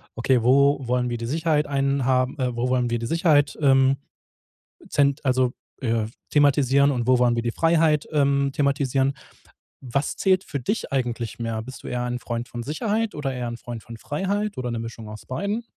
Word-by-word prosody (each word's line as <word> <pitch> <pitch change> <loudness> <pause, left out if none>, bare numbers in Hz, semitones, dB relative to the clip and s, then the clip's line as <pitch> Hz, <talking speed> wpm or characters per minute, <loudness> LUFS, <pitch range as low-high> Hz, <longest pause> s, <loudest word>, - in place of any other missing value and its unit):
Okay, 120 +1 +2
wo 140 +2 +4
wollen 125 0 0
wir 120 - -2
die 115 - -5
Sicherheit 155 +3 +1
einhaben 135 -2 +1
äh, 125 -1 0
wo 120 +1 -1
wollen 125 -1 +1
wir 120 - -1
die 115 - -4
Sicherheit, 155 0 +2
ähm, 135 -1 +4 0.9
zent 140 0 +1
also, 130 -2 +2 0.3
äh, 115 -3 0 0.2
thematisieren 140 -1 +4
und 120 -4 -1
wo 130 0 +4
wollen 120 -1 +3
wir 115 - 0
die 120 0 -2
Freiheit, 165 -1 +2
ähm, 140 -2 +2
thematisieren? 140 -1 +1 0.7
Was 140 +4 -1
zählt 190 -1 +2
für 140 - -4
dich 210 - -3
eigentlich 120 -4 -2
mehr? 115 -1 -3
Bist 130 +3 -10
du - - -7
eher 125 0 -2
ein 125 0 -2
Freund 120 0 -4
von 120 -1 -6
Sicherheit 210 - -1
oder 140 -3 -3
eher 125 -1 -3
ein 120 0 -6
Freund 120 -2 -7
von 115 - -10
Freiheit 200 - -2
oder 125 -1 -3
'ne 115 - -3
Mischung 115 -1 -7
aus 105 0 -10
beidem? 200 - -3
130 Hz, 190 wpm, -24 LUFS, 120-145 Hz, 0.9 s, wo